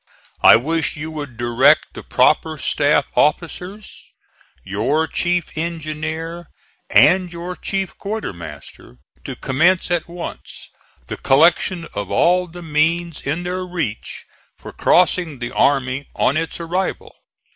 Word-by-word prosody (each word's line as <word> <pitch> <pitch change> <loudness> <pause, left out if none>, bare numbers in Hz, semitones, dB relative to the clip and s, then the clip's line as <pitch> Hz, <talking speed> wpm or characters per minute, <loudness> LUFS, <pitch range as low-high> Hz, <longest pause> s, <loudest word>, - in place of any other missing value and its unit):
I - - +9
wish 155 +8 0
you 155 +2 -5
would 145 -6 -7
direct 120 +2 +3
the - - -8
proper 160 -1 +2
staff 145 -1 +1
officers, 180 +6 -2 0.5
your 120 +12 0
chief 175 +1 -1
engineer 160 +1 -4 0.4
and 180 -1 +5
your 175 +1 -6
chief 195 -1 -3
quartermaster, 85 - -7 0.3
to - - -6
commence 170 +7 +1
at 175 -2 0
once 170 0 -8 0.4
the - - -6
collection 165 +4 +3
of 100 -2 -4
all 180 - +2
the 175 +1 -10
means 165 +1 0
in 155 +5 -3
their 180 +1 -3
reach 165 - -5 0.3
for - - -10
crossing 175 -4 +2
the 120 0 -5
army 135 0 +1
on 135 - +2
its 165 +2 -2
arrival. 175 +3 -3
160 Hz, 125 wpm, -20 LUFS, 140-175 Hz, 0.5 s, I